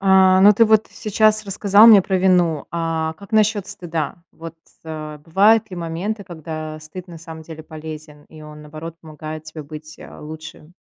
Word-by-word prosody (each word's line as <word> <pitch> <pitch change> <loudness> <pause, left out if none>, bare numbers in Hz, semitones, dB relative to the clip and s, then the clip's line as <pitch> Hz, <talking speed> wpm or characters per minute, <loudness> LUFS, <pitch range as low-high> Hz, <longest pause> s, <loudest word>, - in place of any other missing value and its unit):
А, 190 -1 +5
но 205 +2 +8
ты 225 +3 +4
вот 220 0 +3
сейчас 215 0 +1
рассказал 200 +2 +5
мне 215 -4 +8
про 190 +1 -1
вину. 180 -5 +2
А 165 -1 -2
как 200 +6 -15
насчёт 215 -2 +2
стыда? 170 -7 -4 0.2
Вот, 165 0 -10 0.3
э, 155 -1 -7
бывают 200 +6 +3
ли 180 - -7
моменты, 175 +6 -4
когда 155 -3 -7
стыд 165 +4 -9
на 170 -1 -10
самом 160 -1 -10
деле 160 0 -10
полезен 155 -1 -10
и 155 -1 -15
он, 150 0 -12
наоборот, 155 +2 -9
помогает 155 0 -9
тебе 155 0 -9
быть, 155 +1 -11
а, - - -12
лучше? 155 +1 -11
165 Hz, 175 wpm, -20 LUFS, 155-195 Hz, 0.3 s, но